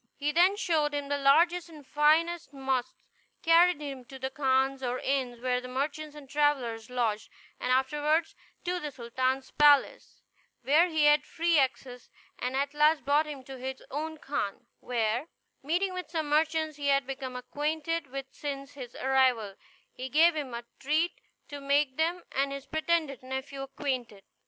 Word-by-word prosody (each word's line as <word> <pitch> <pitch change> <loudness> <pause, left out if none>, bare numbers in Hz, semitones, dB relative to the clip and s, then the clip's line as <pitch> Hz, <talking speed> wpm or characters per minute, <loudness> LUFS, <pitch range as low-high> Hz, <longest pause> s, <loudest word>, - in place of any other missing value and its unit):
He 295 +1 -1
then 355 +5 +4
showed 310 -7 +1
him 285 -1 -3
the 285 - +1
largest 335 +5 +4
and 300 -4 -13
finest 315 +3 +2
mosques, 265 -2 -2 0.4
carried 335 0 +5
him 275 -3 -6
to 265 - -10
the 265 0 -4
khans 265 -1 +1
or 250 -1 -1
inns 255 -3 -1
where 250 0 0
the 250 - -8
merchants 290 +4 -3
and 295 -2 -11
travellers 260 -6 0
lodged, 230 -4 -1 0.3
and 250 - -1
afterward 295 +5 +2 0.4
to 360 0 -1
the 300 - -4
sultan's 260 +1 -2
palace, 290 -1 +3 0.4
where 300 +8 +5
he 315 -2 +2
had 295 0 +5
free 335 -1 +1
access; 255 -2 -2 0.3
and 250 +1 -2
at 280 +1 0
last 300 +1 +3
brought 295 +2 +3
him 285 -3 -7
to 265 0 -9
his 265 +1 -6
own 315 +3 -4
khan, 245 -7 -4
where, 235 +3 -1 0.3
meeting 355 +7 0
with 365 -3 -5
some 320 -2 -2
merchants 315 0 +1
he 285 -1 -3
had 275 -1 +3
become 265 -1 -6
acquainted 305 +5 -2
with 270 +1 -5
since 275 -1 -6
his 250 -4 -9
arrival, 255 -6 +2 0.4
he 255 +1 -6
gave 325 +5 +5
them 280 -6 -4
a 235 0 -6
treat, 310 +5 +1 0.4
to 285 -1 -8
make 280 -1 +1
them 340 +3 0
and 275 +1 0
his 275 0 -6
pretended 315 -4 -1
nephew 265 +2 -5
acquainted. 260 -7 -4
280 Hz, 165 wpm, -29 LUFS, 260-310 Hz, 0.4 s, carried